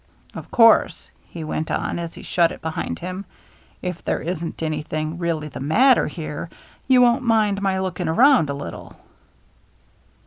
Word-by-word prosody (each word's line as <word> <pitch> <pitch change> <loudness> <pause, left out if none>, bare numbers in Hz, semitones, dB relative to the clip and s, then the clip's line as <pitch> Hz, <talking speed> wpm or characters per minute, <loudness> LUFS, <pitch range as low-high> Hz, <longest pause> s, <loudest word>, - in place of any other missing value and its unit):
" - - -31
Of - - -9
course," 230 -1 +4 0.2
he 165 - -7
went 155 0 -3
on, - - -2
as 170 -1 -6
he - - -11
shut 170 -2 +2
it - - -10
behind 160 0 -3
him, 185 +2 -6 0.3
" - - -30 0.2
if 180 -2 -4
there - - -1
isn't 165 -1 -5
anything 155 +1 -3
really 165 -3 -2
the 145 - -8
matter 235 - +4
here, 160 -1 -6 0.4
you 255 -1 +6
won't 240 +2 +3
mind 215 -4 +1
my 195 -1 0
looking 185 -2 -3
around 240 - +4
a 140 - -2
little." 140 - -8
170 Hz, 170 wpm, -22 LUFS, 155-210 Hz, 0.4 s, you